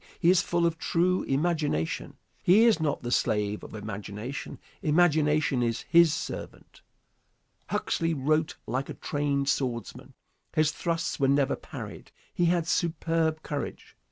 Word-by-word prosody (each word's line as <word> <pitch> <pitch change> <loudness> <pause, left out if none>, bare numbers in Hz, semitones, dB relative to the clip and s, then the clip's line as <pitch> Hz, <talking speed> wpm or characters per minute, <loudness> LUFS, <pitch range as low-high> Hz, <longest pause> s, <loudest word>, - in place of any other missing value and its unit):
He 175 0 +5
is 185 -1 +4
full 170 -1 0
of 165 -1 0
true 180 +2 +1
imagination. 145 - -1 0.2
He 200 +6 +6
is 230 -7 +5
not 150 -4 -1
the 120 - -3
slave 105 -3 0
of - - -9
imagination. 105 +4 -6 0.2
Imagination 150 -4 +3
is 115 -1 0
his 170 -1 +5
servant. 155 0 -6 0.9
Huxley 165 -1 -1
wrote 155 +3 +1
like 130 +4 -2
a - - -5
trained 145 -2 -1
swordsman. 125 -4 -2 0.4
His 155 -1 +3
thrusts 165 0 -2
were 135 - +3
never 140 0 +2
parried. - - -9 0.2
He 175 - +1
had 170 -1 +2
superb 165 -2 0
courage. 145 -2 -5
155 Hz, 135 wpm, -28 LUFS, 135-165 Hz, 0.9 s, He